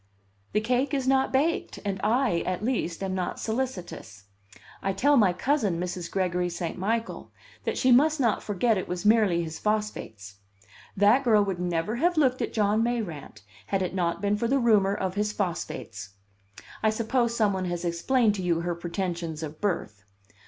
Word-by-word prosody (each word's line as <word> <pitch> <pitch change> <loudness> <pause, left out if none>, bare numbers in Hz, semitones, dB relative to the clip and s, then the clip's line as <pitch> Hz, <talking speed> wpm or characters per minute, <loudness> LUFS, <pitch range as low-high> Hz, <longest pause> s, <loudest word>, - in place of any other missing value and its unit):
"The 210 - +2
cake 255 +5 0
is 265 -2 -1
not 265 0 +3
baked, 300 +6 0
and 195 -2 -2
I, 230 -4 +2
at 185 +4 -3
least, 195 -8 -1
am 190 -1 -2
not 185 -1 -3
solicitous. 220 - -4 0.6
I 195 - -1
tell 285 +9 +3
my 210 -8 +5
cousin, 205 - 0
Mrs. 180 -1 -4
Gregory 180 -2 0
St. 170 -1 -4
Michael, 225 +5 -3 0.3
that - - -1
she 255 - +3
must 300 +5 +5
not 230 -6 +2
forget 210 +1 +1
it - - -5
was 180 +3 -4
merely 210 -6 +4
his 160 -1 -6
phosphates. 160 - -3 0.6
That 210 +7 +5
girl 215 -4 +4
would 190 -3 -3
never 175 +5 -1
have 345 +5 +1
looked 260 -4 +2
at - - -2
John 210 0 +2
Mayrant 185 - -3 0.2
had 195 -1 0
it 185 - -3
not 180 +1 -1
been 205 +1 +1
for 235 - -1
the 270 +3 +2
rumor 210 -6 +3
of 190 -2 -2
his 210 +1 -1
phosphates. 165 - -4 0.7
I 220 - +3
suppose 235 +2 0
some 210 -3 +3
one 190 -1 -2
has 175 0 -3
explained 210 +7 +2
to 200 - -4
you 170 -2 0
her 175 0 -1
pretensions 170 -2 -4
of 155 0 -7
birth. 110 - -2
200 Hz, 180 wpm, -27 LUFS, 175-235 Hz, 0.7 s, my